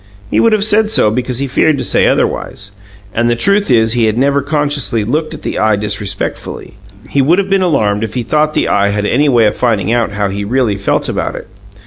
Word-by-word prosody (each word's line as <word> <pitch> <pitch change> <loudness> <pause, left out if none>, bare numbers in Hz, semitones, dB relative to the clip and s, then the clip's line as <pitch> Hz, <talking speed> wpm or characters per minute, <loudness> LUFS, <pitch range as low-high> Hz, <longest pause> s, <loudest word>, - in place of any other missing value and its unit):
He - - +2
would 230 - +3
have 215 -2 +2
said 215 0 +3
so 110 - +2
because 125 +1 -2
he 140 - -1
feared 140 +3 +1
to - - -3
say - - +2
otherwise; 100 0 -2 0.4
and 120 +1 +1
the 120 - +2
truth 200 - +1
is 115 -3 +3
that 120 - -1
he 110 -2 +3
never 140 +4 +1
consciously 145 -7 -1
looked 150 +8 -2
at - - -12
the - - -3
Eye 110 -1 +2
disrespectfully. 100 -1 -4 0.4
He 140 - +2
would 160 +7 +3
have 195 0 -1
been 195 -1 +3
alarmed 110 - +1
if 110 -1 -5
he 125 - -1
thought 155 +4 0
the - - +1
Eye 100 0 +2
had 105 0 -2
any 145 +7 +2
way 120 -4 +3
of 105 - +1
finding 110 -4 0
out 115 -3 0
how 100 -1 -1
he 100 +1 -4
really 115 -1 0
felt 100 0 -1
about - - -3
it. - - -8
120 Hz, 235 wpm, -13 LUFS, 105-150 Hz, 0.4 s, would